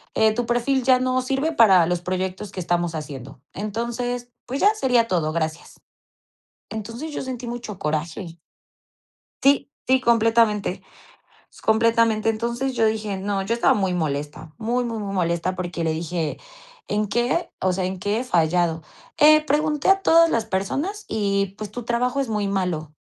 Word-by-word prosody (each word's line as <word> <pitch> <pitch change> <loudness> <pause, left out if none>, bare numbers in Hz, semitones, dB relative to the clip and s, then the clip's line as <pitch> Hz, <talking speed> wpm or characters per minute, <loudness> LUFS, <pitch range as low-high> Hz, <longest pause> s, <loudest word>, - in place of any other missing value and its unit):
eh, 220 0 +4
tu 240 +1 -1
perfil 245 +3 +1
ya 255 0 +5
no 255 0 +1
sirve 270 +5 -1
para 195 - +6
los 175 -1 0
proyectos 185 +2 -3
que 185 - -4
estamos 175 -1 -1
haciendo, 135 -4 -8
entonces, 235 +4 -3 0.2
pues, 265 +3 -4
ya 415 +2 +5
sería 250 - +2
todo, 160 -4 0
gracias". 160 0 -4 0.9
Entonces 230 +8 -6
yo - - -4
sentí 255 -2 -5
mucho 235 -5 -6
coraje. 165 +3 -3 1.0
Sí 280 +1 +3 0.2
sí, 260 +1 +4
completamente 225 -4 +2 0.8
completamente. 225 0 +3
Entonces 235 +4 -2
yo 225 -2 +3
dije: 215 -2 -1
"No", 195 0 -2
yo 205 +4 -1
estaba 235 - +3
muy 190 -3 0
molesta, 150 -1 -3
muy 235 +2 -1
muy 230 -2 -3
muy 200 -1 -4
molesta 175 0 0
porque 175 -2 -4
le 160 - +1
dije: 165 0 -3 0.5
"¿En 210 0 0
qué? 240 - 0
O 185 -1 +2
sea, 185 - -2
¿en 185 0 -4
qué 205 +3 -1
he 250 - -2
fallado? 170 -4 +1 0.4
Eh, 305 +1 +7
pregunté 300 +2 +1
a 390 0 +5
todas 330 -3 +5
las 230 -5 0
personas 290 - -2
y, 200 -2 0
pues, 210 -2 -6
tu 245 +3 -6
trabajo 245 +3 0
es 265 - -3
muy 210 -2 -1
malo". 180 -6 -2
215 Hz, 165 wpm, -23 LUFS, 180-245 Hz, 1.0 s, Eh